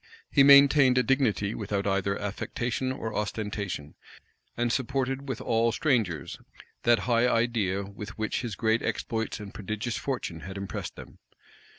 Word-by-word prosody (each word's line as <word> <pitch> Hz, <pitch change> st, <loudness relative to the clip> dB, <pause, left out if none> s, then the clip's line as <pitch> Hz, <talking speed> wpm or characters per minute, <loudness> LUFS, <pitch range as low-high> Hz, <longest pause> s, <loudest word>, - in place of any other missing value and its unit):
He 140 Hz, -, +5 dB
maintained 140 Hz, -1 st, +7 dB
a 125 Hz, -, +4 dB
dignity 115 Hz, -7 st, +1 dB
without 100 Hz, -1 st, -2 dB
either 100 Hz, 0 st, 0 dB
affectation 120 Hz, +5 st, -3 dB
or 115 Hz, -4 st, -4 dB
ostentation; 105 Hz, -7 st, -3 dB, 0.6 s
and 120 Hz, 0 st, +1 dB
supported 135 Hz, +1 st, -1 dB
with 125 Hz, -, -3 dB
all 115 Hz, 0 st, +1 dB
strangers 110 Hz, -, 0 dB, 0.4 s
that 120 Hz, 0 st, +3 dB
high 120 Hz, 0 st, +3 dB
idea 115 Hz, -5 st, +1 dB
with 100 Hz, +1 st, -9 dB
which 110 Hz, 0 st, -1 dB
his 120 Hz, -6 st, -4 dB
great 110 Hz, 0 st, +1 dB
exploits 110 Hz, 0 st, -2 dB
and 105 Hz, -2 st, -9 dB
prodigious 110 Hz, +3 st, -4 dB
fortune 120 Hz, -11 st, -3 dB
had 95 Hz, +5 st, -8 dB
impressed 100 Hz, 0 st, -5 dB
them. -, -, -12 dB
115 Hz, 145 wpm, -28 LUFS, 100-125 Hz, 0.6 s, maintained